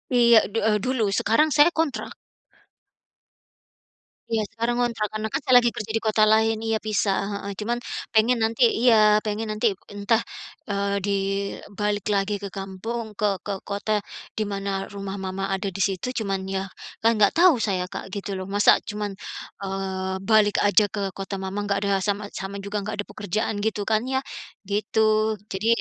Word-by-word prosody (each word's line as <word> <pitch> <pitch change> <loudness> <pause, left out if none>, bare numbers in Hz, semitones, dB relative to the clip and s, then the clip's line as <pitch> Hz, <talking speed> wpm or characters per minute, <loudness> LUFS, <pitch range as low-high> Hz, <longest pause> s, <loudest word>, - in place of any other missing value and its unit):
Iya 235 -2 +7
du 225 - -3
eee, 210 -1 +3
dulu. 255 -4 +1
Sekarang 305 +8 +3
saya 295 +2 +7
kontrak. 320 -5 -2 2.1
Iya, 220 -1 +1
sekarang 230 +1 -1
ngontrak, 235 -3 0
karena 215 +1 -4
kan 275 - 0
saya 260 -4 +3
lagi 240 -1 +4
kerja 215 0 -5
di 225 - -1
kota 215 -1 +3
lain. 220 +1 +3
Iya, 225 0 0
pisah, 210 -2 +1 0.2
heeh, 200 0 -5
cuman 235 +3 -1 0.3
pengen 235 +3 +4
nanti 225 +3 +2 0.2
iya, 215 -3 +5
pengen 215 +1 -2
nanti 220 0 +2 0.2
entah, 205 +3 +2 0.5
eee, 200 0 0
di 200 - 0 0.7
balik 205 -1 0
lagi 200 +1 +1
ke - - -2
kampung, 210 +4 -5
ke 200 -2 0
ke 205 - -4
kota, 205 +1 -1 0.3
di 215 - 0
mana 200 0 -3 0.2
rumah 200 -1 -5
mama 190 0 -3
ada 195 +1 -3
di 195 - -8
situ. 190 +3 -4
Cuman 195 -3 -2
ya, 190 0 -2 0.3
kan 230 +1 +3
nggak 210 -2 +4
tahu 350 -4 +7
saya, 185 -2 -1
Kak, 195 0 -7
gitu 200 0 -4
loh. 185 0 -5
Masa 205 0 +6
cuman, 210 -1 -4 0.5
eee, 190 -1 -3
balik 215 -2 +4
aja 205 0 +5
ke 215 - -4 0.2
kota 195 0 -5
mama 195 +2 -3
nggak 200 -1 0
ada - - 0
sama 205 0 -1
sama 195 +1 -5
juga 200 +1 -4
nggak 210 - -4
ada 205 - -3
pekerjaan, 215 +1 -2
gitu 215 -1 -1
kan 220 0 +2
ya, 265 - +2 0.5
gitu. 215 +1 +1
Jadi, 200 +2 -3
210 Hz, 170 wpm, -24 LUFS, 200-220 Hz, 2.1 s, Iya